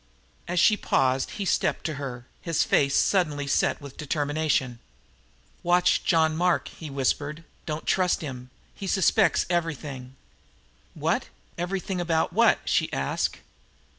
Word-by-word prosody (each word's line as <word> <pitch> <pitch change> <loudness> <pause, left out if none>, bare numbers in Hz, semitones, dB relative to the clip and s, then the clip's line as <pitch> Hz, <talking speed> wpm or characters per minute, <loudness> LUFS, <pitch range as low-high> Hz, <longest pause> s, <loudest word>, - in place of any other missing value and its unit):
As 175 0 0
she 210 +4 +5
paused 130 -8 +1
he 200 - -2
stepped - - 0
to 155 - -1
her, 125 -3 -6 0.2
his 165 -3 +1
face 140 -1 +2
suddenly 150 -7 +2
set 140 - +1
with 140 -2 -11
determination. 145 -4 -1 0.8
"Watch 175 +1 +3
John 160 -2 +3
Mark," 180 +1 +1
he 160 - -9
whispered. 145 +3 -1 0.2
"Don't 155 0 -4
trust 185 -2 +2
him. 130 -4 -7 0.2
He 195 - -7
suspects 190 0 +3
everything!" 150 -7 -3 0.8
"What? - - 0 0.3
Everything 185 +1 -3
about 165 -2 0
what?" - - +4
she - - +1
asked. 70 - -1
155 Hz, 130 wpm, -26 LUFS, 140-175 Hz, 0.8 s, she